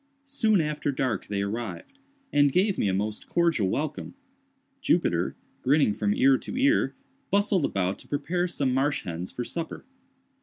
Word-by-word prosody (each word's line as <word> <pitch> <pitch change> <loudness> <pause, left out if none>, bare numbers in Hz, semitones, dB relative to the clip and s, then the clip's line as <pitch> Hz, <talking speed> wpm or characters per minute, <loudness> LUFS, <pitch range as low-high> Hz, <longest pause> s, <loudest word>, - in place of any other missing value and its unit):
Soon 220 -9 +2
after 150 -1 -1
dark 130 -3 -2
they 100 -1 -1
arrived, 110 - -5 0.3
and 145 -1 +5
gave 190 +5 +2
me - - 0
a - - +2
most 105 +2 -2
cordial 165 - +2
welcome. 150 - -3 0.7
Jupiter, 90 - +1 0.3
grinning 140 -4 +3
from 105 0 0
ear 135 0 +4
to - - -6
ear, 280 +4 +3 0.3
bustled 200 -5 +2
about 95 0 -1
to - - -14
prepare 175 +5 -1
some 140 -7 0
marsh 140 +2 +1
hens 85 +1 -5
for 125 - -5
supper. 165 +5 -5
140 Hz, 155 wpm, -27 LUFS, 105-175 Hz, 0.7 s, and